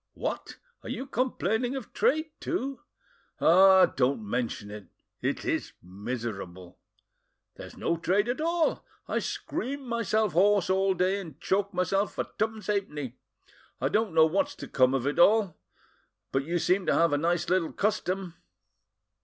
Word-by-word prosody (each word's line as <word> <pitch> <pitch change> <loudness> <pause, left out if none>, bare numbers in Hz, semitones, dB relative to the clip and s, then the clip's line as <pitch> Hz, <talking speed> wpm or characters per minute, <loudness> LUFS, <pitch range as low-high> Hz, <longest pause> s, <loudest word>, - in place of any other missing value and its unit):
"What! - - -4 0.2
are - - -9
you 265 - -4
complaining 255 -1 -1
of 260 -6 -7
trade 310 +2 +1
too?" 275 -6 -3 0.6
"Ah! 190 +2 +7
don't 125 -4 -1
mention 115 -3 -3
it; 105 -2 -9 0.3
it - - -2
is - - -2
miserable!" 95 -3 -6 0.7
"There's - - -11
no 170 - 0
trade 195 +6 +1
at 245 +5 -2
all. 335 0 +1 0.2
I - - 0
scream 275 0 -4
myself 220 -4 0
hoarse 195 +1 +3
all 190 0 +2
day, 185 +3 +1
and 160 -6 -11
choke 200 +3 0
myself 195 +2 0
for - - -1 0.2
twopence 220 0 -1
halfpenny. 150 - -3 0.6
I - - 0
don't 210 -5 0
know 160 -1 +7
what's 200 - 0
to - - -8
come 130 0 +3
of 130 -1 -1
it 145 +3 -1
all. 200 -2 +5 0.8
But 135 +1 0
you 170 +3 -1
seem 180 +3 +1
to - - +3
have 165 -2 +3
a - - +3
nice 175 +2 0
little 180 -3 +1
custom." 190 -3 -1
185 Hz, 155 wpm, -28 LUFS, 145-220 Hz, 0.8 s, Ah